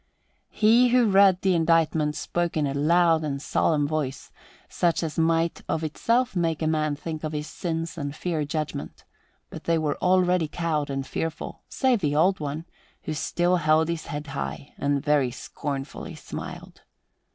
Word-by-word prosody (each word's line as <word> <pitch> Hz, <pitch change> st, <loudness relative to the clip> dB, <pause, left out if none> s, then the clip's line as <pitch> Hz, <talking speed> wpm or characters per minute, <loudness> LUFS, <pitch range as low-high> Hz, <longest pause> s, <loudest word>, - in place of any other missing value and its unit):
He 230 Hz, +3 st, +4 dB
who 245 Hz, 0 st, +4 dB
read 190 Hz, -1 st, +5 dB
the 190 Hz, -1 st, +3 dB
indictment 160 Hz, -2 st, +2 dB
spoke 175 Hz, -1 st, -2 dB
in 150 Hz, -, +2 dB
a 135 Hz, -, -1 dB
loud 165 Hz, +2 st, +3 dB
and 140 Hz, -2 st, -2 dB
solemn 145 Hz, +1 st, +1 dB
voice, 145 Hz, -3 st, -3 dB, 0.4 s
such 170 Hz, -1 st, 0 dB
as 160 Hz, 0 st, -3 dB
might 165 Hz, +1 st, +1 dB
of 160 Hz, -, -1 dB
itself 230 Hz, -, 0 dB
make 165 Hz, -2 st, 0 dB
a -, -, +1 dB
man 155 Hz, -1 st, +1 dB
think 155 Hz, +1 st, -6 dB
of 155 Hz, 0 st, -3 dB
his 150 Hz, 0 st, -3 dB
sins 165 Hz, 0 st, -4 dB
and 145 Hz, 0 st, -4 dB
fear 160 Hz, -2 st, -2 dB
judgment; 150 Hz, -1 st, -4 dB, 0.5 s
but -, -, -9 dB
they 165 Hz, 0 st, +2 dB
were 155 Hz, -2 st, -1 dB
already 180 Hz, -2 st, +3 dB
cowed 155 Hz, -2 st, -2 dB
and 135 Hz, -1 st, -3 dB
fearful, 160 Hz, +2 st, -4 dB
save 260 Hz, -4 st, +2 dB
only 150 Hz, -, +3 dB
the 145 Hz, -, -2 dB
Old 190 Hz, +4 st, +3 dB
One, 150 Hz, +2 st, -4 dB, 0.4 s
who 155 Hz, -, -3 dB
still 175 Hz, +4 st, +1 dB
held 155 Hz, 0 st, +3 dB
his 170 Hz, -2 st, -3 dB
head 145 Hz, +1 st, -5 dB
high 140 Hz, 0 st, -5 dB
and 140 Hz, -1 st, 0 dB
very 145 Hz, -4 st, +3 dB
scornfully 135 Hz, +2 st, -6 dB
smiled. -, -, -8 dB
160 Hz, 170 wpm, -25 LUFS, 150-175 Hz, 0.5 s, read